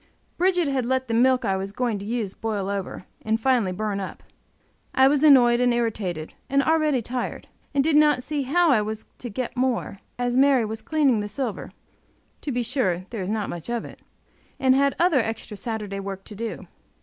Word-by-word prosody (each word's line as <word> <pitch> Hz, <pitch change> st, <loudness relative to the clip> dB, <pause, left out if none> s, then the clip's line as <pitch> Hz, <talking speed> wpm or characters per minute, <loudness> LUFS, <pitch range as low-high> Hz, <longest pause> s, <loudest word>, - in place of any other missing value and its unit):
Bridget 360 Hz, -2 st, +2 dB
had 270 Hz, -2 st, 0 dB
let 260 Hz, 0 st, 0 dB
the 230 Hz, -, -2 dB
milk 250 Hz, +1 st, +3 dB
I 195 Hz, -2 st, +1 dB
was 195 Hz, +1 st, -3 dB
going 230 Hz, -1 st, -1 dB
to 200 Hz, -, -7 dB
use 220 Hz, -3 st, -2 dB
boil 210 Hz, -3 st, -3 dB
over, 195 Hz, -2 st, -4 dB, 0.2 s
and 220 Hz, +1 st, 0 dB
finally 235 Hz, -6 st, +2 dB
burn 205 Hz, +1 st, -2 dB
up. 190 Hz, -, -7 dB, 0.7 s
I 265 Hz, 0 st, +6 dB
was 285 Hz, +1 st, +2 dB
annoyed 245 Hz, -5 st, +6 dB
and 250 Hz, 0 st, +3 dB
irritated, 205 Hz, -9 st, -2 dB, 0.2 s
and 275 Hz, 0 st, +3 dB
already 305 Hz, -4 st, +2 dB
tired, 245 Hz, +2 st, -4 dB, 0.3 s
and 275 Hz, -, +4 dB
did 315 Hz, 0 st, +2 dB
not 300 Hz, -4 st, +4 dB
see 300 Hz, +1 st, -2 dB
how 325 Hz, +5 st, +3 dB
I 230 Hz, -5 st, +4 dB
was 215 Hz, +1 st, -4 dB
to 245 Hz, -, -5 dB
get 245 Hz, +3 st, -4 dB
more, 250 Hz, -6 st, -1 dB, 0.2 s
as 245 Hz, 0 st, -1 dB
Mary 265 Hz, -3 st, +4 dB
was 220 Hz, +1 st, -5 dB
cleaning 285 Hz, -7 st, +2 dB
the 205 Hz, -, -3 dB
silver 235 Hz, 0 st, -4 dB, 0.7 s
(to 290 Hz, -, -3 dB
be 245 Hz, -1 st, -1 dB
sure, 190 Hz, -8 st, -1 dB
there 225 Hz, -4 st, -4 dB
is 185 Hz, -, -3 dB
not 215 Hz, -1 st, -1 dB
much 175 Hz, +4 st, -7 dB
of 240 Hz, -1 st, -2 dB
it), -, -, -12 dB, 0.6 s
and 260 Hz, -1 st, +4 dB
had 275 Hz, +1 st, +2 dB
other 340 Hz, -5 st, +3 dB
extra 225 Hz, -2 st, -3 dB
Saturday 205 Hz, -1 st, -4 dB
work 195 Hz, -1 st, -6 dB
to 210 Hz, -, -10 dB
do. 230 Hz, +2 st, -5 dB
240 Hz, 200 wpm, -24 LUFS, 210-270 Hz, 0.7 s, I